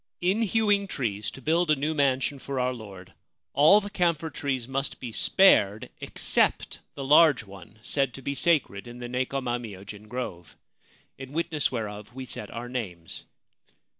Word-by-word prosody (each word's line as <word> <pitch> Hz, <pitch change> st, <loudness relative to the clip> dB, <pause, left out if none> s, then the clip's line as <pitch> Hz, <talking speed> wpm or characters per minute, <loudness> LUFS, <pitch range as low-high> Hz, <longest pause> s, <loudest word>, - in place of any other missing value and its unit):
In 190 Hz, +5 st, +2 dB
hewing 205 Hz, -2 st, +2 dB
trees 110 Hz, -, -3 dB
to 135 Hz, -, -12 dB
build 165 Hz, +3 st, +2 dB
a 155 Hz, -, +5 dB
new 150 Hz, +3 st, -1 dB
mansion 140 Hz, -1 st, +1 dB
for 135 Hz, 0 st, -4 dB
our 125 Hz, 0 st, +1 dB
lord, 100 Hz, -6 st, -11 dB, 0.4 s
all 155 Hz, +9 st, +7 dB
the 205 Hz, -1 st, -7 dB
camphor 170 Hz, -5 st, 0 dB
trees 130 Hz, -4 st, -2 dB
must 135 Hz, +1 st, -3 dB
be 125 Hz, -3 st, -6 dB
spared 110 Hz, -, +4 dB
except -, -, 0 dB, 0.2 s
the 140 Hz, -, -5 dB
large 150 Hz, -3 st, +6 dB
one 100 Hz, 0 st, -14 dB
said 135 Hz, -1 st, 0 dB
to 135 Hz, -, -10 dB
be 140 Hz, -, -2 dB
sacred 140 Hz, -, +1 dB
in 120 Hz, 0 st, -9 dB
the 120 Hz, 0 st, -6 dB
Nekoma 125 Hz, 0 st, -2 dB
myojin 105 Hz, -1 st, -9 dB
grove. 105 Hz, -8 st, -6 dB, 0.6 s
In 135 Hz, +1 st, -9 dB
witness 165 Hz, -2 st, 0 dB
whereof 105 Hz, -1 st, -5 dB
we 130 Hz, 0 st, -6 dB
set 105 Hz, -4 st, -7 dB
our 120 Hz, +1 st, -6 dB
names. 95 Hz, -10 st, -6 dB
130 Hz, 165 wpm, -27 LUFS, 110-155 Hz, 0.6 s, all